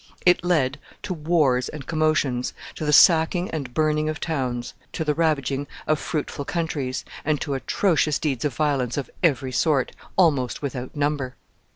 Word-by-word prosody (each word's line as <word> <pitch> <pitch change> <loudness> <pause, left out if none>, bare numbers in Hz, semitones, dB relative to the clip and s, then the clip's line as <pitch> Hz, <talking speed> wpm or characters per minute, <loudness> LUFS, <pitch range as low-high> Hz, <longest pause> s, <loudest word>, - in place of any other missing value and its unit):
It 180 -1 +5
led 145 -6 +1 0.2
to 205 - -2
wars 150 -6 +2
and 150 -4 -8
commotions, 155 -5 0 0.2
to 155 - -5
the 150 - +1
sacking 165 +3 +5
and 140 -6 -4
burning 155 +2 +1
of 155 - -4
towns, 125 -6 -2 0.2
to 160 - -2
the 150 - +2
ravaging 145 -3 0 0.2
of 155 -1 +1
fruitful 145 -2 -3
countries, 145 -5 -3 0.2
and 150 -1 +1
to 145 - -2
atrocious 155 +2 +1
deeds 140 -7 -2
of 145 -4 -1
violence 140 -5 0
of 140 -4 -4
every 135 -6 +2
sort, 140 0 +1 0.3
almost 145 -9 +2
without 130 -1 -4
number. 145 -3 -1
150 Hz, 160 wpm, -24 LUFS, 130-160 Hz, 0.3 s, It